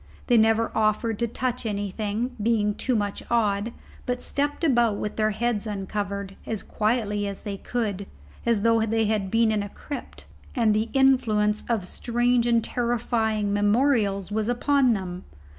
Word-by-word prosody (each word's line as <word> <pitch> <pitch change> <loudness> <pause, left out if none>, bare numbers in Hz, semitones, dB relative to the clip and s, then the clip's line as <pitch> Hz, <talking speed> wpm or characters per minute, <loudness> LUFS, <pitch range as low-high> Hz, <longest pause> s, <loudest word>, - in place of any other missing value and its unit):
They 245 - +3
never 225 +1 +3
offered 215 0 +1
to 235 - +1
touch 250 +2 -2
anything, 210 +3 -2
being 210 -2 +2
too 255 +4 -1
much 205 -2 -1
awed, 215 -1 +1 0.4
but 250 0 -1
stepped 290 +5 -2
about 240 -8 +3
with 210 - -4
their 215 0 +2
heads 220 0 -1
uncovered, 200 -1 -4
as 220 -3 -4
quietly 210 -2 0
as 200 -1 -6
they 205 -1 -4
could, 200 -2 -3 0.4
as 230 -3 +1
though 230 -1 +4
they 225 0 +1
had 210 -2 0
been 225 +1 +3
in 215 -1 +1
a 205 - -5
crypt, 285 +7 -8 0.3
and 225 -4 +3
the 215 +2 0
influence 225 -6 +3
of 220 -6 0
strange 240 +3 +1
and 235 -1 +3
terrifying 225 -3 0
memorials 205 -2 +2
was 215 +1 -1
upon 255 +1 +3
them. 185 -3 -5
220 Hz, 160 wpm, -25 LUFS, 205-235 Hz, 0.4 s, though